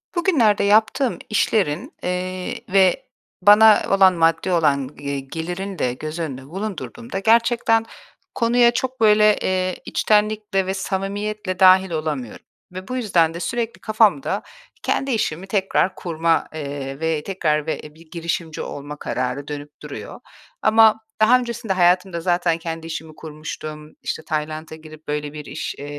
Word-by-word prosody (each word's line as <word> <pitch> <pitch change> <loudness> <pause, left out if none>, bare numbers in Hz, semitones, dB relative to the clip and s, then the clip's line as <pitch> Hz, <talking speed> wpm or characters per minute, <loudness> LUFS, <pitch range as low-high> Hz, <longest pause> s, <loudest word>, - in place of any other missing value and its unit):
Bugünlerde 275 - +3
yaptığım 220 +5 +2
işlerin, 215 - 0
eee, 180 0 -3
ve 190 -1 +3 0.4
bana 210 +2 +7
olan 195 -1 +5
maddi 165 +2 +1
olan, 140 -6 +2
eee, 140 -1 -3
gelirini 175 +7 -5
de 125 -1 0
göz 155 +5 -6
önünde 135 -5 -5
bulundurduğumda 200 +4 -5
gerçekten 230 +1 +3 0.5
konuya 235 0 +4
çok, 255 0 -3
böyle, 210 -1 +5
eee, 185 -1 0
içtenlikle 210 -2 +1
ve 190 - -2
samimiyetle 195 0 -3
dâhil 190 0 +6
olamıyorum 150 -7 -4 0.3
ve 185 +1 -8
bu 255 - -3
yüzden 175 -9 +2
de 170 - -6
sürekli 235 +5 -3
kafamda 215 +4 +2 0.4
kendi 270 0 0
işimi 190 -6 -2
tekrar 190 -2 +1
kurma, 165 -2 0
eee, 140 -2 -5
ve 160 -2 -1
tekrar 155 -6 -1
ve - - -2
bir 160 0 -19
girişimci 170 -2 -3
olma 145 +1 -7
kararı 125 +3 -3
dönüp 145 0 -8
duruyor. - - -8 0.4
Ama 220 0 +5 0.2
daha 240 +4 +6
öncesinde 235 -4 -3
hayatımda 180 -1 +2
zaten 175 -1 +1
kendi 165 -1 -6
işimi 160 -1 -7
kurmuştum. 155 0 -8
İşte, 160 - -4
Tayland’a 155 +1 -4
girip 155 0 -14
böyle 150 0 -3
bir 150 -1 -8
iş, - - -5
eee, 145 - -8
185 Hz, 140 wpm, -21 LUFS, 155-215 Hz, 0.5 s, bana